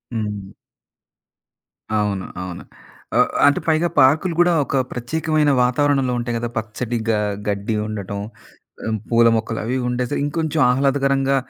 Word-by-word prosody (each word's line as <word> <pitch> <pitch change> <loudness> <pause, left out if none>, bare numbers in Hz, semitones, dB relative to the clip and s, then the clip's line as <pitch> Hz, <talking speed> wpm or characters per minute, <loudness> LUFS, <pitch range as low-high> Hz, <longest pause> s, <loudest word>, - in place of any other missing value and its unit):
హ్మ్. 105 -3 -4 1.5
అవును. 100 -3 -1 0.2
అవును. 90 -1 -7 0.5
ఆహ్, - - +4 0.2
అంటే 145 - +4
పైగా 160 +2 +3
పార్కులు 155 +6 +4
గూడా 175 0 +5
ఒక - - -3 0.2
ప్రత్యేకమైన 155 +4 0
వాతావరణంలో 135 0 +2
ఉంటాయి 120 0 -2
కదా! 120 0 -3
పచ్చడి 110 +2 -3
గ - - +5 0.4
గడ్డి 100 +2 -1
ఉండటం, 100 -1 -5 0.7
ఆ - - -1 0.2
పూల 115 0 +5
మొక్కలు 110 0 -2
అవి 125 +3 -1
ఉండేస 125 +1 -2
ఇంకొంచెం 160 +1 -1
ఆహ్లాదకరంగా 135 +1 +2
125 Hz, 125 wpm, -21 LUFS, 110-145 Hz, 1.5 s, గూడా